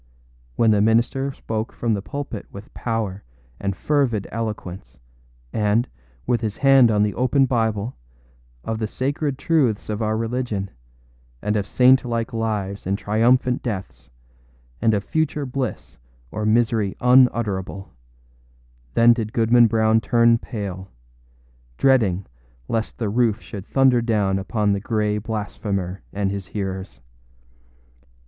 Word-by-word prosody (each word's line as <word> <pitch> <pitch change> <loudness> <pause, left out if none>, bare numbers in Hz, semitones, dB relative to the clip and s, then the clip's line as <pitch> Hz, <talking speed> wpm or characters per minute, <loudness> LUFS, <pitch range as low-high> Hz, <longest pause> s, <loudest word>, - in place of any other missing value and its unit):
When 115 -1 +4
the 105 -1 +3
minister 120 +5 +2
spoke 110 -3 -4
from 115 -2 -1
the 100 - -1
pulpit 140 -3 -6
with 100 +2 -11
power 110 -5 -3 0.4
and 100 -1 -2
fervid 130 -9 0
eloquence, 105 -5 -5 0.6
and, 110 +3 +1 0.4
with 120 -1 +1
his 110 -2 -3
hand 135 -3 +6
on 105 -1 +3
the 105 - 0
open 130 +2 +2
Bible, 110 -2 -1 0.7
of 110 +5 -3
the 110 - -1
sacred 140 +4 -2
truths 135 -11 +1
of 105 +1 -2
our 110 0 0
religion, 115 -4 -2 0.7
and 105 - -1
of 105 -1 -1
saint 130 +3 +5
like 115 -1 -3
lives 105 -4 -3
and 100 +1 0
triumphant 125 +5 +2
deaths, 100 -6 -6 0.7
and 110 -2 +3
of 100 - -1
future 150 0 -1
bliss 125 - -5 0.3
or 105 0 -2
misery 110 -3 +1
unutterable, 115 -7 +2 1.0
then 120 +1 +6
did 110 -2 -3
Goodman 115 +1 +5
Brown 110 0 +3
turn 115 +2 +4
pale, 95 -5 -6 0.9
dreading 105 -9 +3 0.4
lest 115 -1 -2
the 115 - -2
roof 115 -1 +1
should 100 -1 -9
thunder 130 -3 +3
down 105 -4 +1
upon 105 +1 0
the 100 - -1
gray 105 -1 0
blasphemer 100 -3 -4
and 100 -1 -1
his 100 -2 -5
hearers. 95 - -5
110 Hz, 130 wpm, -22 LUFS, 100-120 Hz, 1.0 s, hand